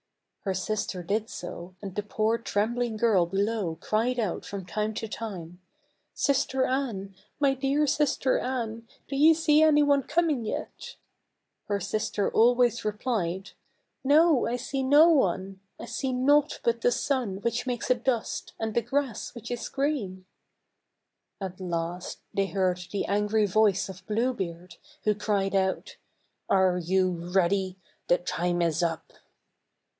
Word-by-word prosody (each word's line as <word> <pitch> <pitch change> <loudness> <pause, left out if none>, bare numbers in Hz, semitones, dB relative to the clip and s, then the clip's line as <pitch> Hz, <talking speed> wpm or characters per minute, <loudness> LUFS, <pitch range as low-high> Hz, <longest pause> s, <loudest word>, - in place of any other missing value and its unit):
Her 190 -1 0
sister 190 -2 -2
did 210 +5 -1
so, 175 +1 -8
and 195 -2 -5
the 210 - -2
poor 215 +2 0
trembling 230 +1 -1
girl 210 -6 +3
below 195 -2 -1
cried 230 +6 0
out 210 -6 -2
from 195 -2 -6
time 215 +4 -2
to 225 - -3
time, 185 -6 -7 0.3
" - - -43 0.3
Sister 265 -2 +1
Anne, 230 -8 -2 0.3
my 280 -2 +3
dear 275 +3 +1
sister 285 -2 +1
Anne, 230 -3 -3 0.2
do 275 - -4
you 310 +4 +6
see 310 -1 +4
any 300 -1 +5
one 285 -1 +4
coming 310 -3 0
yet 215 - -5 0.4
?" - - -54
Her 205 -1 0
sister 205 +1 -1
always 240 0 +3
replied 210 -4 -2 0.5
"No, 300 0 +4
I 235 - -1
see 265 +2 -3
no 290 +5 +6
one; 195 - +1 0.2
I - - -6
see 265 +2 -3
naught 285 +4 +2
but 235 0 +1
the 245 - +3
sun 245 -6 -1
which 235 +3 -1
makes 245 0 -1
a - - +5
dust, 240 -1 -2
and 220 -1 -2
the 235 - +2
grass 255 -1 -2
which 235 0 -8
is 240 -1 -4
green 245 -11 -2 0.5
:" - - -55
At 190 -2 -6
last 175 0 -3 0.2
they 195 0 +1
heard 185 -2 0
the 200 - -1
angry 210 +1 +1
voice 200 -1 +2
of 190 -1 -10
Blue 230 +4 +1
Beard, 175 -4 -6 0.3
who 210 - +3
cried 205 -2 -1
out, 190 -1 -1 0.5
"Are 185 -2 +3
you 185 +2 +1 0.2
ready? 190 0 +1 0.3
the 175 - +4
time 175 0 -1
is 165 0 +1
up." 165 -1 -2
215 Hz, 155 wpm, -27 LUFS, 190-255 Hz, 0.5 s, you